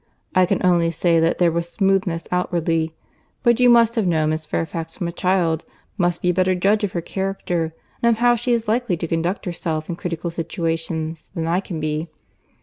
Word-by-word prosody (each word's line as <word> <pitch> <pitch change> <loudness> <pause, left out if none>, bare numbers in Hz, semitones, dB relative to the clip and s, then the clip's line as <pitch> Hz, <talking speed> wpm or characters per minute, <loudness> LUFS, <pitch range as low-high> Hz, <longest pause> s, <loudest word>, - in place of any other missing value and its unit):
I 185 -1 +4
can - - 0
only 170 -2 +4
say 165 +1 +2
that 165 +1 +2
there 175 -2 +3
was 170 +1 -2
smoothness 190 -4 +1
outwardly. 165 -3 0 0.5
But 235 -1 +4
you, 250 0 +6
who 240 - +8
have 230 -3 +2
known 155 -2 +2
Miss 155 0 -3
Fairfax 165 +1 -3
from 175 - -2
a - - -3
child, 175 -3 +1 0.3
must 175 -3 0
be 180 - +3
a - - -3
better 185 +1 +2
judge 205 +4 +2
of 200 - -1
her 170 - -1
character, 180 -3 -2 0.3
and 235 - +4
of 230 - +2
how 240 +1 +4
she 240 +1 -1
is 230 -2 +1
likely 220 -4 +1
to 170 - -3
conduct 170 +4 -1
herself 165 -3 -3
in 170 - -2
critical 170 0 -4
situations, 165 -1 -3
than 165 -2 -2
I 170 +2 +1
can 180 -4 -5
be." 155 +1 -2
175 Hz, 205 wpm, -21 LUFS, 165-195 Hz, 0.5 s, who